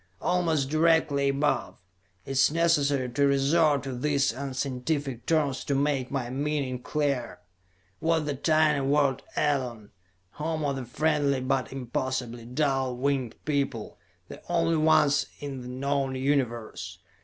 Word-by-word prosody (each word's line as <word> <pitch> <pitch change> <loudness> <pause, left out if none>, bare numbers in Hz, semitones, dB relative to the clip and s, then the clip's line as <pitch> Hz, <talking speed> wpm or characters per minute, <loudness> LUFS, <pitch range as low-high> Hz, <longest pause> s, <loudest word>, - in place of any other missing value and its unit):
Almost 165 -6 +1
directly 155 -3 +3
above 135 - 0 0.5
it - - -6
is 135 0 +4
necessary 145 -5 +2
to 140 +4 +2
resort 140 +1 +3
to 135 -2 -4
these 140 0 +1
unscientific 135 0 -3
terms 150 -5 +1
to 140 - 0
make 140 -2 0
my 130 -3 -3
meaning 140 -2 -2
clear 140 -3 -1 0.6
was 160 -1 +1
the 145 - -1
tiny 155 +1 +2
world 140 -1 +2
Elon, 125 -7 -1 0.4
home 155 +2 -3
of 140 -1 -1
the 130 - -5
friendly 145 +1 +1
but 130 0 -1
impossibly 125 -2 -3
dull 130 -1 0
winged 135 -2 -1
people, 140 -7 -2 0.3
the - - -10
only 165 -1 +2
ones 150 -2 +4
in 140 -3 -6
the 125 - -8
known 135 +1 -1
Universe. 130 -4 -2
140 Hz, 130 wpm, -27 LUFS, 130-150 Hz, 0.6 s, is